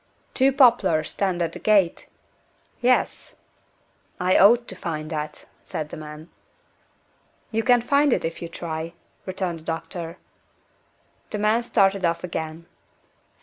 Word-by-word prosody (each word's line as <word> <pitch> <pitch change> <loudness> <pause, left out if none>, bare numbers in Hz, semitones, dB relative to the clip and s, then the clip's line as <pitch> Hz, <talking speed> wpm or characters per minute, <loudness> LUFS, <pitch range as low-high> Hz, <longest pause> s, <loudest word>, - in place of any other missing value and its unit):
"Two 270 +1 +4
poplars 230 - +4
stand 185 -3 0
at 165 - -2
the - - -8
gate?" 200 -5 +2 0.7
"Yes." 250 +1 +1 0.8
"I 180 +1 +2
ought 235 +4 +6
to 190 - -6
find 155 -3 -5
that," 150 -1 -5 0.2
said 155 -1 -5
the - - -7
man. 155 +1 -10 1.2
"You 225 0 +1
can 245 0 +4
find 285 +2 +3
it, - - +1
if 165 - -4
you 170 - -5
try," 165 0 -5 0.3
returned 185 -3 -3
the - - -17
doctor. 165 +1 -5 1.1
The 210 - -3
man 215 +3 +2
started 195 -4 +2
off 170 0 0
again. 160 -1 -5
180 Hz, 135 wpm, -24 LUFS, 165-220 Hz, 1.2 s, ought